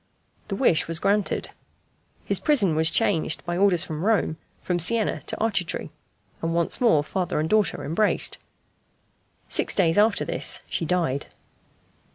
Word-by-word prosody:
The 195 - -3
wish 195 - +2
was 165 0 -1
granted. 200 +3 -1 0.7
His - - 0
prison 215 - +2
was 160 +1 +3
changed, 160 0 0
by 175 0 -3
orders 185 -2 +3
from 155 -1 -6
Rome, 205 -7 +1 0.2
from 180 -1 -2
Siena 220 +5 +1
to - - -2
Arcetri, 200 -6 -2 0.5
and 165 0 -2
once 170 +8 +2
more 160 -12 +4
father 180 0 -2
and 155 - -1
daughter 215 +2 +1
embraced. 200 +8 0 1.1
Six - - +1
days 170 -1 +2
after 210 0 +2
this - - 0
she 165 - -3
died. 160 -5 -1
180 Hz, 145 wpm, -24 LUFS, 160-210 Hz, 1.1 s, more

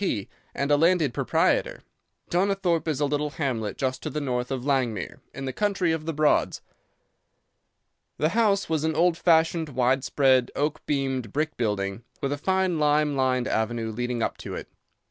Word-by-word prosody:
P. 105 - -1 0.3
and 140 +1 -1
a 145 - +5
landed 165 -4 +3
proprietor. - - +1 0.5
Donnithorpe 180 -2 +1
is 150 -4 -1
a 145 - +2
little 145 +1 -1
hamlet 125 - -3
just 130 -1 -2
to - - -4
the 150 - -3
north 125 -3 -2
of 130 -2 -3
Langmere, 130 -7 -1
in 135 - -6
the 130 - -3
country 195 -5 +1
of 160 -1 -3
the - - +1
Broads. 150 - +2 1.5
The 155 - +2
house 205 0 +2
was 160 -2 0
an 160 -1 0
old 175 +1 +3
fashioned, 165 -1 +2
wide 130 0 +1
spread, 130 -3 +3
oak 150 +1 -1
beamed 135 -6 -1
brick 155 +4 -1
building, 105 -2 -2 0.2
with 140 - -2
a 145 - -1
fine 190 -1 +1
lime 150 -1 +2
lined 130 -2 +1
avenue 110 0 -1
leading 120 +1 -2
up - - -2
to - - -6
it. - - -7
145 Hz, 175 wpm, -26 LUFS, 125-160 Hz, 1.5 s, a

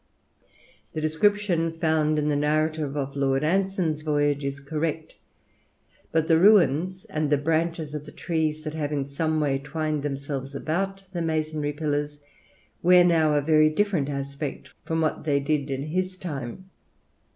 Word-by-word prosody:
"The 155 - -3
description 165 +1 +1
found 155 -2 +1
in 150 0 0
the 150 - +1
narrative 150 0 0
of 140 -1 -3
Lord 135 0 +1
Anson's 180 -2 0
voyage 145 -2 +1
is 140 +1 -3
correct; 155 +2 -3 1.0
but 160 -1 +1
the 160 -1 +5
ruins 185 -2 +4
and 155 -1 -2
the 145 - +4
branches 160 +1 -1
of 150 0 -6
the - - -9
trees 155 -2 -2
that 155 -1 -4
have 150 -2 -3
in 140 -2 -1
some 155 +3 -1
way 140 -3 +1
twined 155 +1 -2
themselves 140 -1 -4
about 195 +7 -2
the 175 - -2
masonry 155 -2 -1
pillars, 145 -1 -2 0.6
wear 180 0 +7
now 160 -3 +3
a 145 - +3
very 155 +1 +4
different 165 -4 0
aspect 140 0 -5
from 160 0 -1
what 155 - -1
they 145 -2 +2
did 145 0 -1
in 135 0 -2
his 185 +4 -2
time. 170 +2 -6
155 Hz, 155 wpm, -25 LUFS, 145-165 Hz, 1.0 s, wear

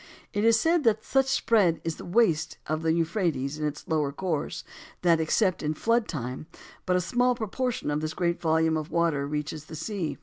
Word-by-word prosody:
It 205 - 0
is 225 0 +5
said 330 +2 +2
that 220 -1 +3
such 270 0 +3
is - - -2
the - - +3
spread 195 -8 +2
and 165 +3 -5
waste 165 -9 +2
of 155 0 -2
the 165 0 +1
Euphrates 165 -4 -1
in 150 - 0
its 150 0 -7
lower 150 -3 0
course, 160 0 -3 0.4
that, 170 -2 +4
except 185 +4 +1
in 155 0 -1
flood 230 +5 +1
time, 130 -1 -5 0.4
but 180 - +3
a - - +3
small 245 +6 +2
proportion 235 -4 -2
of 150 +1 -1
this 155 0 -3
great 170 -1 0
volume 160 -1 +2
of 155 +1 -4
water 165 -5 +1
reaches 150 +1 -4
the 160 - -9
sea. 170 +1 -3
165 Hz, 205 wpm, -27 LUFS, 155-215 Hz, 0.4 s, is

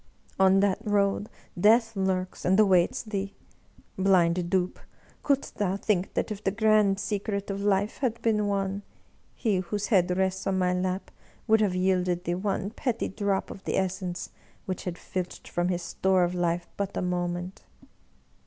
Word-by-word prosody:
On 190 0 +5
that 200 -1 +2
road 205 -1 +1 0.3
Death 225 +3 +4
lurks, 185 -1 -1
and 190 +3 +3
awaits 185 -5 +4
thee! 200 -3 -4 0.6
Blind 180 -2 +3
dupe, 185 -1 0 0.4
couldst 280 -1 0
thou 195 -2 +1
think 195 -2 -1
that - - -1
if 210 0 -6
the - - +2
grand 210 -1 +3
secret 200 -1 -2
of 195 0 -4
life 205 +1 +1
had 235 -4 -1
been 210 -2 +2
won, 195 0 -1 0.5
he 215 -5 +1
whose 205 +3 -3
head 180 -1 +3
rests 190 0 0
on 190 -1 +1
my 180 -1 +2
lap 185 +1 -2 0.3
would 220 -1 +4
have 195 -4 +1
yielded 180 -1 +1
thee 175 - -1
one 195 +2 -2
petty 235 0 -2
drop 200 -1 -1
of 195 - -10
the - - 0
essence 185 -1 -2 0.3
which 185 -3 -4
had 180 -1 -4
filched 180 -1 -5
from 175 0 -1
his 175 -1 -1
store 190 +1 +2
of 175 0 0
life 175 -1 -1
but 200 -1 -3
a - - -1
moment? 175 0 -3
190 Hz, 165 wpm, -27 LUFS, 180-205 Hz, 0.6 s, On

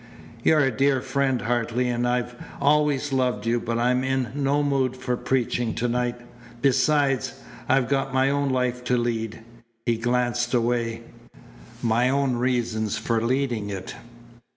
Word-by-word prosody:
"You're 155 -1 +4
a 135 -2 +2
dear 135 +2 +2
friend, 130 -1 0
Hartley, 120 +1 0
and 120 0 0
I've 125 0 -1 0.3
always 145 -1 +2
loved 125 -5 0
you, 120 +1 +1
but 115 0 -2
I'm 125 +2 +2
in 130 -2 0
no 145 +1 +1
mood 135 -3 0
for 130 -1 -2
preaching 120 -2 -1
tonight. 120 0 -1 0.4
Besides, 135 -1 +2 0.3
I've 135 -2 +3
got 135 0 0
my 130 +1 +2
own 140 0 0
life 125 -1 -1
to 125 0 +2
lead" 115 -2 -2 0.4
he 120 -1 +1
glanced 120 +1 0
away 115 -1 0 0.8
"my 120 +2 +2
own 135 -2 +1
reasons 120 -4 0
for 115 -1 0
leading 120 -4 0
it." 95 -2 -6
125 Hz, 145 wpm, -24 LUFS, 120-135 Hz, 0.8 s, You're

